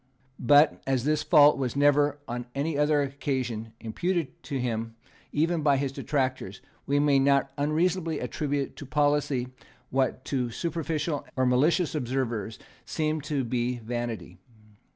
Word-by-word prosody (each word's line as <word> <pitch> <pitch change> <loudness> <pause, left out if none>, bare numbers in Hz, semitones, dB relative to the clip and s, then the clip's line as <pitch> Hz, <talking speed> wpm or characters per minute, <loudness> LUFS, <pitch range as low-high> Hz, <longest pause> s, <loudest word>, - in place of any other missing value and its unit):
But, 145 +5 +5
as 130 -3 +1
this 150 +1 +1
fault 150 -2 +6
was 130 -2 -2
never, 145 +1 +3
on 120 0 -5
any 145 +3 -1
other 150 0 +3
occasion, 130 -5 -3
imputed 165 +6 -2
to 140 - -3
him 115 -2 -3 0.4
even 165 +2 +1
by 145 -2 +3
his 135 0 -1
detractors, 130 -8 -2 0.3
we 140 +1 +2
may 145 -1 +4
not 140 0 +3
unreasonably 160 +3 0
attribute 140 +2 -2
to 145 - -8
policy 145 -3 +1 0.4
what 130 0 0
to 125 -3 -1
superficial 160 +2 -2
or 130 - +2
malicious 150 +7 +2
observers 120 -6 -2 0.3
seemed 155 -1 -2
to 145 -4 -1
be 120 +1 -1
vanity. 120 0 -5
140 Hz, 135 wpm, -27 LUFS, 125-150 Hz, 0.4 s, fault